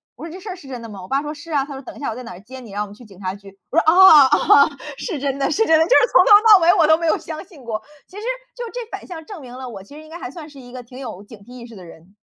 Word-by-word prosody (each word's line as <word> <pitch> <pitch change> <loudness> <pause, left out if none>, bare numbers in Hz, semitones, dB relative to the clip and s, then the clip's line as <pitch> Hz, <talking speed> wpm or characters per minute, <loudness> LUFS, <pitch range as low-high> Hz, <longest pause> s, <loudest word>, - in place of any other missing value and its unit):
我 - - -10
说： 330 - -9
“这 370 - -9
事 405 - -10
儿 370 - -5
是 340 -7 -15
真 255 -3 -7
的 230 - -9
吗？ 200 - -10
“我 185 - -11
爸 275 +1 0
说：” 295 - -6
是 300 +3 -12
啊。” 285 -3 +1
他 285 - -9
说： 270 - -8
“等 - - -10
一 - - -13
下 285 - -3
我 220 - -5
在 250 - -8
哪 210 -7 -10
接 255 +6 -12
你？ 225 -5 -13
然 205 - -4
后 - - -2
我 - - -13
们 200 - -14
去 240 - -16
警 195 -3 -17
察 190 -1 -4
局。” 200 -1 -15
我 305 - -4
说： - - +5
“啊， 320 -3 +8
啊， 280 +1 +4 0.3
是 355 - -5
真 275 0 -2
的， 275 -1 -1
是 445 +8 +1
真 320 -1 +4
的。” 320 - +3
就 - - -9
是 - - +4
从 - - +6
头 - - +2 0.2
到 415 - +10
尾 345 +2 +5
我 335 -6 +3
都 315 0 +5
没 335 - -4
有 320 - +2
相 315 -1 -8
信 330 -9 -17
过， 225 -2 -4 0.3
其 375 - -14
实 420 - -8 0.3
就 - - -6
这 - - -6
反 - - -8
向 335 -3 -9
证 400 +1 -10
明 250 -2 -11
了 255 0 -8
我 200 -5 -10
其 240 +9 -16
实 305 - -11
应 310 - -16
该 330 - -9
还 255 - -8
算 315 0 -11
是 285 -2 -15
一 245 -1 -13
个 250 0 -8
挺 250 +1 -15
有 225 -8 -8
警 220 +2 -14
惕 245 +5 -15
意 235 - -11
识 230 - -14
的 185 -3 -12
人， 170 +4 -17
275 Hz, 400 characters per minute, -20 LUFS, 230-320 Hz, 0.3 s, 到